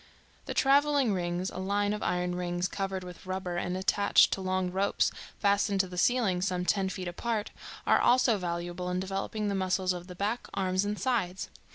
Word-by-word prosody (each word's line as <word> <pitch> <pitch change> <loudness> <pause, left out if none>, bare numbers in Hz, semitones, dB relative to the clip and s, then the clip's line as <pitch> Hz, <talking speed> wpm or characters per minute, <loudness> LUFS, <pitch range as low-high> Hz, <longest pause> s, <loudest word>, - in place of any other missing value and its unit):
The - - -4
traveling 280 -3 +4
rings, 175 0 -2
a - - -6
line 205 +2 0
of 210 - -4
iron 180 0 0
rings, 175 0 -1
covered 195 -1 -3
with 180 0 -11
rubber 185 -2 -3
and 180 +1 -2
attached 200 +2 +4
to 195 - -3
long 185 -1 -1
ropes 195 +2 +1 0.3
fastened 200 -1 +2
to 190 - -5
the 180 - -9
ceiling 195 -2 +2
some 180 -1 -1
ten 190 0 +1
feet 185 -1 -5
apart, 215 +4 -2 0.3
are - - +4
also 245 -4 +4
valuable 175 0 -3
in 180 0 -1
developing 195 +3 -3
the 200 - 0
muscles 185 -1 +1
of 175 0 -7
the 180 - -9
back, 210 +6 -2
arms 185 0 +1
and 210 +1 -2
sides. 200 -8 -1
190 Hz, 190 wpm, -29 LUFS, 180-205 Hz, 0.3 s, traveling